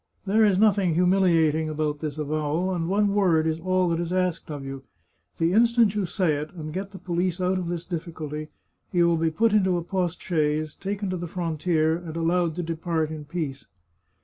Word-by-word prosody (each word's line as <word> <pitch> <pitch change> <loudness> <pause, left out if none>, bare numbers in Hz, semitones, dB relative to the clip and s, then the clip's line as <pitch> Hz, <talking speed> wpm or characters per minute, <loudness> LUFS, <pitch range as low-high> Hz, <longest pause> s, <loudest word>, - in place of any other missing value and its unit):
There 215 +3 +3
is 200 -3 +4
nothing 195 -5 +3
humiliating 170 -4 +3
about 150 -1 -2
this 150 -1 -4
avowal, 155 +4 -1
and 170 -1 -2
one 205 +1 +2
word 175 -6 +3
is 160 0 0
all 185 +1 +1
that 165 0 0
is 170 0 -3
asked 185 -3 -1
of 145 -3 -6
you. 135 0 -6 0.6
The 165 +2 +1
instant 230 -1 +4
you 205 -3 -1
say 170 -6 +1
it, 150 +1 -5
and 155 -2 -6
get 195 +2 -4
the 195 - -10
police 180 0 -1
out 185 +1 +1
of 180 - -4
this 170 -1 -4
difficulty, 155 -3 -5 0.4
you 175 -1 +3
will 170 -1 +2
be 165 0 +1
put 220 +7 +2
into 190 -4 +3
a 170 - -3
post 180 -1 -2
chaise, 155 -2 0
taken 200 0 -4
to 185 - -2
the 175 0 -5
frontier, 160 -1 0
and 170 -2 -8
allowed 165 0 +1
to 175 - -3
depart 165 -1 -2
in 155 -1 -6
peace." 145 -3 -5
170 Hz, 200 wpm, -25 LUFS, 155-185 Hz, 0.6 s, is